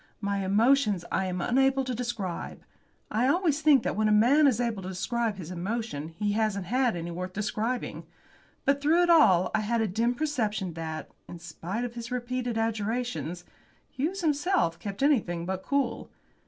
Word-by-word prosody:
My 200 -1 -1
emotions 210 -1 +3
I 190 - +1
am 180 -1 -3
unable 270 +5 +2
to 255 -1 -3
describe. 235 -7 -4 0.5
I 235 +4 +2
always 310 0 +2
think 295 -6 +5
that - - -1
when 215 +1 +2
a - - +3
man 255 +8 +5
is 250 -4 +2
able 230 -5 -1
to 185 - -6
describe 220 +4 -1
his 175 -2 -7
emotions 180 -4 -4
he 205 -1 0
hasn't 210 -3 0
had 245 +2 +1
any 170 0 -4
worth 180 +2 -5
describing. 215 +4 -3 0.6
But 280 0 +2
through 325 +5 +4
it 345 - +4
all 185 - +5
I - - +2
had 230 +2 0
a 220 - +1
dim 230 +6 0
perception 215 - -1
that, 160 -1 -6 0.2
in 175 - -8
spite 175 +6 -5
of 240 - -6
his 235 -1 -7
repeated 245 -1 -2
adjurations, 225 -5 -2 0.5
Hughes 345 +9 -2
himself 295 - +1
kept 200 +4 -5
anything 185 - +1
but 190 +1 -3
cool. 270 0 -1
225 Hz, 175 wpm, -28 LUFS, 190-255 Hz, 0.6 s, think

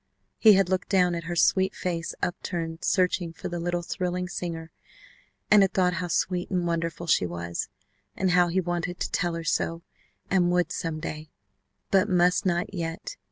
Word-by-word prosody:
He 220 -2 +8
had 195 -1 +4
looked 185 0 -1
down 180 -3 +3
at 170 -1 -4
her 175 0 -3
sweet 190 +2 +3
face 170 -2 -3
upturned 165 -2 -3
searching 180 -3 +1
for - - -6
the 175 -1 -4
little 175 0 -1
thrilling 180 0 -2
singer, 165 -2 -5 0.8
and 210 -1 +8
had 195 -1 +3
thought 180 -1 +3
how 180 - -2
sweet 180 +1 -1
and 180 -2 0
wonderful 170 0 -2
she 130 - +3
was, 85 0 -4 0.5
and 190 -1 +1
how 180 0 +5
he 175 +2 +1
wanted 175 0 -2
to - - -3
tell 175 -3 0
her 165 - -4
so, 165 +1 -1 0.4
and 180 -2 +2
would 180 -2 +1
some 160 -2 -3
day, 155 0 -6 0.6
but 195 +2 +4
must 180 +1 +3
not 175 0 +1
just - - -22
yet. 165 0 -4
175 Hz, 185 wpm, -26 LUFS, 165-180 Hz, 0.8 s, He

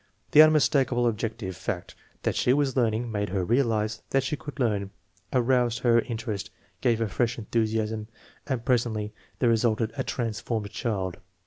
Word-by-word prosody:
The 150 - +9
unmistakable 140 -5 +4
objective 110 -4 -2
fact 90 -1 -4 0.3
that - - 0
she 125 - +3
was 140 -2 +1
learning 115 -1 +1
made 105 -1 -1
her 95 -1 -1
realize 110 -2 +1
that 135 -1 +2
she 145 +3 -1
could 145 0 -9
learn, 105 -5 0 0.4
aroused 125 -2 +2
her 120 -1 +5
in 115 -1 -3
terest, 110 -4 -4 0.3
gave 120 -2 +3
her 115 0 0
fresh 120 +3 0
enthusiasm, 110 -1 -1 0.4
and 130 -5 -2
presently 115 -4 0 0.2
there 120 - +2
resulted 115 -1 +1
a - - -1
transformed 110 -2 -3
child. 95 -7 -2
115 Hz, 155 wpm, -27 LUFS, 110-125 Hz, 0.4 s, The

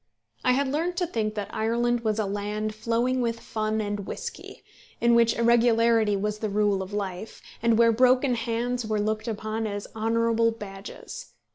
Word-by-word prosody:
I 250 - +4
had 275 +2 +1
learned 330 +6 -1
to 355 - +1
think 220 -9 -2
that 205 -1 -5
Ireland 235 +2 +1
was 220 -2 -1
a 215 - 0
land 210 +2 -3
flowing 235 +4 0
with 230 -1 -1
fun 215 -1 -2
and 205 -1 -3
whisky, 475 -1 -7 0.4
in 235 0 +4
which 235 -1 +4
irregularity 230 -2 +4
was 210 +1 -2
the 215 - -2
rule 205 -1 +1
of 190 +1 -6
life, 200 0 -5 0.2
and 230 -1 +3
where 230 0 +6
broken 255 +3 +4
heads 240 +1 -1
were 215 -1 -1
looked 215 +2 -1
upon 220 0 -3
as 205 -1 -4
honourable 230 +1 +2
badges. 210 - -9
225 Hz, 170 wpm, -26 LUFS, 210-235 Hz, 0.4 s, where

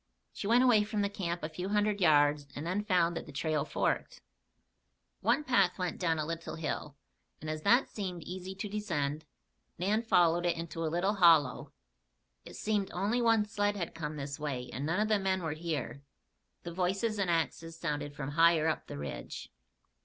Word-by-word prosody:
She 200 - -5
went 240 +3 +5
away 230 -5 +5
from 210 0 -1
the 200 - -1
camp 175 -4 -3
a 155 - -2
few 180 +4 -5
hundred 210 0 +1
yards 145 -3 +4
and 145 - -5
then 185 +4 -1
found 180 -4 +2
that - - -5
the - - -9
trail 150 +1 0
forked. - - -1 1.0
One 300 - +2
path 200 -10 +3
went 180 -3 -3
down 165 -3 +1
a 155 - -1
little 165 +1 -5
hill, 150 -2 -4 0.4
and 155 - -8
as 155 0 -4
that 240 +9 +4
seemed 180 -5 -5
easy 185 +3 -6
to 190 +2 -4
descend, 160 -8 -2 0.5
Nan 205 +5 +1
followed 175 -6 +3
it 170 - +1
into 165 0 -5
a 160 - 0
little 175 +5 +1
hollow. 165 -9 +4 0.7
It - - -10
seemed 210 -2 -1
only 205 +7 0
one 225 -2 +4
sled 205 0 0
had 175 -4 -4
come 155 -2 -5
this 140 +1 -5
way 135 -4 -4
and 140 +3 -3
none 165 +5 0
of 215 - +2
the 215 -1 +2
men 190 -1 0
were 160 -2 -1
here. 155 -4 -4 0.6
The 170 - -6
voices 195 +5 0
and 195 -2 +1
axes 165 0 -1
sounded 145 -3 -3
from 145 -1 -4
higher 165 0 +4
up 160 - -1
the - - -7
ridge. 70 -4 -6
170 Hz, 190 wpm, -31 LUFS, 155-200 Hz, 1.0 s, went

